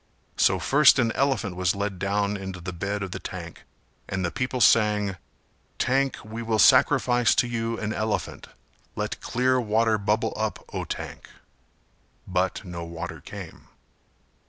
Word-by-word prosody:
So - - +3
first 140 0 +5
an 120 -3 +2
elephant 130 -9 0
was 90 +1 +1
led 100 -2 -3
down 100 +1 0
into 95 -2 -6
the 90 +1 -6
bed 100 +3 -3
of 95 - -5
the - - -5
tank - - -8 0.4
and 95 -2 -1
the 85 - -2
people 125 +3 -2
sang 105 -4 +3 0.6
"Tank, 135 +1 +1
we 110 +2 -6
will 115 -1 0
sacrifice 120 +2 +5
to - - +3
you 115 -1 -2
an 110 0 -2
elephant 110 -1 -3 0.5
Let - - -4
clear 130 +1 +1
water 110 0 +2
bubble 110 +2 0
up, 110 0 -3
O - - -3
tank," - - -7 1.0
but 95 +2 -1
no 85 -2 -6
water 85 0 -7
came. - - -10
105 Hz, 150 wpm, -25 LUFS, 95-115 Hz, 1.0 s, first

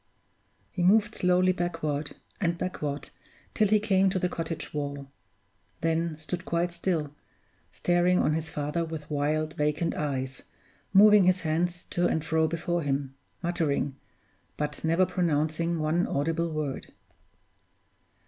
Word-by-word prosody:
He 180 - -3
moved 205 +4 +4
slowly 180 -1 +3
backward 165 -5 -2 0.2
and 170 -2 0
backward 150 -6 -4 0.4
till 215 - +3
he 215 +1 +4
came 195 -2 +3
to 190 - -1
the 180 -1 0
cottage 165 -1 -4
wall 140 -2 -4 0.7
then 165 0 0
stood 170 +3 -5
quite 170 0 0
still, 170 -4 -1 0.6
staring 175 +1 +2
on 155 - +2
his 160 0 -2
father 150 +3 -2
with 160 -2 -7
wild, 155 +2 0
vacant 150 +3 0
eyes, 135 -3 -3 0.5
moving 205 0 +7
his 185 0 +3
hands 170 +2 -1
to 175 0 +2
and 160 -1 -1
fro 160 0 +2
before 170 +1 -1
him, 140 -2 -2 0.3
muttering, 155 -5 0 0.6
but 150 -1 -3
never 165 +3 +3
pronouncing 165 -1 0
one 160 +3 +1
audible 165 +4 0
word. 150 -3 -3
165 Hz, 130 wpm, -28 LUFS, 150-180 Hz, 0.7 s, moving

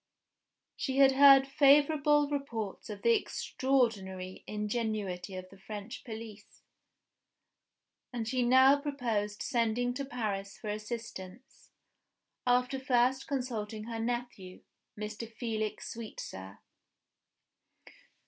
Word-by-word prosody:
She 265 -1 -2
had 275 -1 +7
heard 270 0 +8
favorable 290 +1 +4
reports 240 -10 -4
of 205 -1 -7
the 235 - +5
extraordinary 205 -11 -1
ingenuity 210 -4 -3
of 185 0 -7
the 195 - -15
French 210 +2 -7
police; 220 -2 -10 1.5
and 235 -3 -4
she 255 +2 0
now 260 +3 +6
proposed 230 -8 -2
sending 240 +1 0
to 275 - -4
Paris 210 -7 -4
for 215 - -4
assistance, 215 +1 -8 0.8
after 250 +2 +2
first 255 0 +2
consulting 225 -6 -3
her 225 0 -5
nephew, 235 -5 -4 0.4
Mr. 215 +2 -6
Felix 220 -2 -3
Sweetsir. 100 - -8
230 Hz, 100 wpm, -31 LUFS, 210-260 Hz, 1.5 s, heard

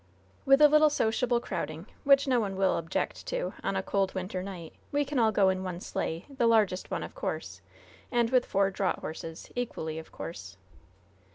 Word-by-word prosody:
"With 275 +2 +6
a - - +11
little 305 +1 +6
sociable 240 -2 +1
crowding, 155 -6 -4 0.2
which 275 0 +5
no 255 -2 +3
one 200 -4 -2
will 190 0 +2
object 165 0 -3
to - - -2
on 195 - -1
a 190 - 0
cold 195 -1 0
winter 185 0 -3
night, 180 -4 -7 0.2
we 290 0 +1
can 275 -1 -1
all 225 -2 +4
go 200 -3 +4
in 190 0 -1
one 180 -2 -4
sleigh 165 -2 -3
the 265 -4 0
largest 210 -5 +2
one, - - -2
of - - -8
course, - - -4 0.5
and 240 -2 +2
with 255 -1 +3
four 195 0 +2
draught 190 0 -1
horses, 160 +1 -7
equally 160 -10 -3
of 160 - -12
course." 95 - -8
200 Hz, 190 wpm, -29 LUFS, 180-250 Hz, 0.5 s, a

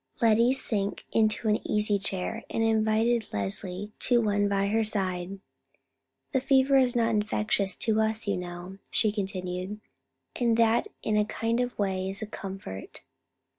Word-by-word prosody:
Lettie 230 +2 +4
sank 205 -6 -1
into 220 0 +2
an 210 0 +3
easy 210 -1 +1
chair, 195 +3 -2
and 225 - 0
invited 220 +1 +2
Leslie 180 - -3
to 245 -1 +3
one 205 -2 +1
by 200 0 +1
her 220 +2 +2
side. 190 -3 -2 0.9
"The 265 - +1
fever 270 +1 +4
is 255 -2 +3
not 230 -1 +2
infectious 210 -2 0
to 220 -1 +2
us, 220 +1 0
you 200 - +1
know," 180 +1 -7
she 215 - +2
continued, 190 -1 -4 0.6
"and 235 -2 +2
that 230 0 +3 0.2
in 215 - +1
a 210 - +4
kind 230 +2 -1
of 245 0 -2
way 190 -2 -1
is 195 +3 -2
a - - -2
comfort. 190 - -8
210 Hz, 155 wpm, -28 LUFS, 195-225 Hz, 0.9 s, Lettie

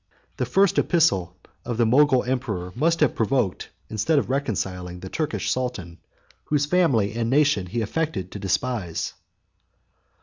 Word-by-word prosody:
The - - -1
first 195 -1 +3
epistle 95 - +2 0.3
28 - - -11
of 115 - -2
the 120 - +3
Mogul 130 +2 +4
emperor 115 -9 -3
must 165 +6 +1
have 150 - +4
provoked, 115 -4 0 0.2
instead 110 +9 0
of 135 - 0
reconciling, 95 -9 -3
the 95 - -7
Turkish 155 +6 -2
sultan, 105 -10 -3 0.5
whose 145 -1 +1
family 140 - +2
and 115 0 -1
nation 135 -9 +3
he 115 +6 -2
affected 110 - -2
to 105 - -7
despise. 100 -2 -2
120 Hz, 145 wpm, -24 LUFS, 95-145 Hz, 0.5 s, Mogul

